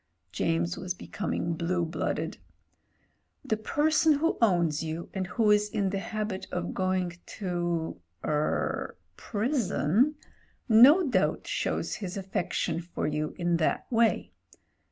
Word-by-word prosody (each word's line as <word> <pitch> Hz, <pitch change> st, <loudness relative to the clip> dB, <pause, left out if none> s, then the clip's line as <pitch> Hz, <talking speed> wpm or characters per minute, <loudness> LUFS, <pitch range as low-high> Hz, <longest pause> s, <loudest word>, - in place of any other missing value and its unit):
James 85 Hz, +1 st, 0 dB
was 180 Hz, -1 st, -3 dB
becoming 170 Hz, -3 st, -3 dB
blue 170 Hz, +1 st, 0 dB
blooded. 165 Hz, -, -3 dB, 1.1 s
"The 225 Hz, -, +1 dB
person 300 Hz, +8 st, +3 dB
who 310 Hz, +3 st, +1 dB
owns 170 Hz, -8 st, +3 dB
you, 165 Hz, +1 st, -5 dB
and 190 Hz, -2 st, -2 dB
who 210 Hz, +4 st, +2 dB
is 210 Hz, 0 st, +3 dB
in 200 Hz, -3 st, 0 dB
the 195 Hz, -, -1 dB
habit 210 Hz, -2 st, -4 dB
of 180 Hz, 0 st, -3 dB
going 185 Hz, -2 st, -1 dB, 0.2 s
to 175 Hz, -, -2 dB
— 85 Hz, 0 st, -42 dB
er 150 Hz, 0 st, -1 dB
— -, -, -44 dB
^prison, 230 Hz, -, +1 dB, 0.5 s
no 280 Hz, +10 st, +7 dB
doubt 195 Hz, -7 st, +1 dB
shows -, -, -1 dB
his 195 Hz, -2 st, -5 dB
affection 180 Hz, -3 st, -2 dB
for 170 Hz, +1 st, -4 dB
you 150 Hz, 0 st, -2 dB
in 175 Hz, -1 st, +1 dB
that 160 Hz, -, 0 dB
way. 230 Hz, -1 st, +2 dB
185 Hz, 135 wpm, -28 LUFS, 170-220 Hz, 1.1 s, no